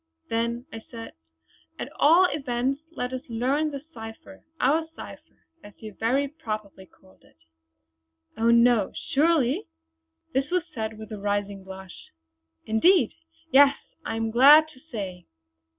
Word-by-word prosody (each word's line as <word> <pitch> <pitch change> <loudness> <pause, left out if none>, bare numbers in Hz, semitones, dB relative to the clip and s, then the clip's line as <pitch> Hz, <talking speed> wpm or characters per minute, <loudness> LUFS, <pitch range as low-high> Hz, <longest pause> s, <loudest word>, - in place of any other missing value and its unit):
"Then," 235 +2 -1 0.2
said 230 -1 -9 0.7
I, - - -2
"at - - -9
all 335 +5 +6
events 270 -1 -2
let 255 -6 -5
us 255 - -3
learn 265 +7 0
the 280 -2 -7
cipher 225 +5 -11 0.2
our 315 +5 +2
cipher - - -12 0.2
as 205 - -13
you 215 -2 -9
very 255 +7 0
properly 215 -9 -7
called 190 +1 -24
it." - - -25 1.0
"Oh 230 +1 +2
no! 235 -3 +4 0.2
surely?" 290 -3 +2 0.7
this 270 +2 0
was 360 -1 +1
said 220 -3 -4
with 220 +1 -10
a 210 - -6
rising 205 -1 -2
blush. 190 -1 -11 0.6
"Indeed, 245 - +4 0.4
yes 280 +1 +6 0.3
I 225 - -3
am 225 0 -2
glad 290 +6 +8
to 260 - -18
say!" 200 - -7
240 Hz, 135 wpm, -26 LUFS, 220-280 Hz, 1.0 s, glad